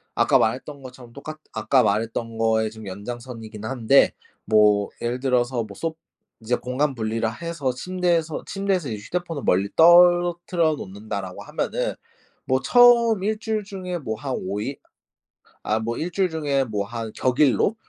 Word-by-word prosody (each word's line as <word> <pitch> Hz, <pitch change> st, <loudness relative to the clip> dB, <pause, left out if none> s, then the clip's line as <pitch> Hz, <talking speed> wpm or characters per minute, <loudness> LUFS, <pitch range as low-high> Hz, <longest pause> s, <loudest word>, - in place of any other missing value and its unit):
아까 -, -, +4 dB
말했던 135 Hz, +5 st, -2 dB
것처럼 125 Hz, -2 st, -12 dB
똑같 155 Hz, +3 st, -8 dB
아까 110 Hz, +4 st, +2 dB
말했던 115 Hz, +2 st, -1 dB
거에 110 Hz, -1 st, +2 dB
좀 110 Hz, 0 st, -11 dB
연장선이긴 110 Hz, +2 st, -8 dB
한데 130 Hz, +2 st, +3 dB, 0.3 s
뭐 105 Hz, -2 st, +4 dB
예를 120 Hz, +2 st, -2 dB
들어서 125 Hz, -2 st, +1 dB
뭐 105 Hz, -2 st, -11 dB
솦 165 Hz, +5 st, -3 dB, 0.5 s
이제 115 Hz, +3 st, 0 dB
공간 135 Hz, +4 st, -1 dB
분리를 115 Hz, 0 st, -1 dB
해서 165 Hz, -6 st, -2 dB
'침대에서 170 Hz, +1 st, -1 dB
침대에서 195 Hz, -7 st, -1 dB
이제 110 Hz, -, -4 dB
휴대폰을 170 Hz, -5 st, -4 dB
멀리 95 Hz, +2 st, +2 dB
떨어뜨려 175 Hz, -1 st, +5 dB
놓는다.'라고 100 Hz, -4 st, -6 dB
하면은 -, -, -2 dB, 0.5 s
뭐 130 Hz, 0 st, +1 dB
처음 235 Hz, -, +5 dB
1 215 Hz, +1 st, -1 dB
주일 220 Hz, -1 st, -2 dB
중에 185 Hz, -3 st, -5 dB
뭐 110 Hz, -7 st, -4 dB
한 135 Hz, +1 st, -3 dB
5 100 Hz, +2 st, -4 dB
일? 135 Hz, +6 st, -4 dB, 0.9 s
아 110 Hz, +1 st, 0 dB
뭐 115 Hz, +1 st, -3 dB
1 175 Hz, +3 st, -3 dB
주일 190 Hz, 0 st, +1 dB
중에 145 Hz, -4 st, 0 dB
뭐 105 Hz, -4 st, -3 dB
한 115 Hz, 0 st, -6 dB
격일로? 135 Hz, -, +2 dB
130 Hz, 305 characters per minute, -23 LUFS, 110-170 Hz, 0.9 s, 떨어뜨려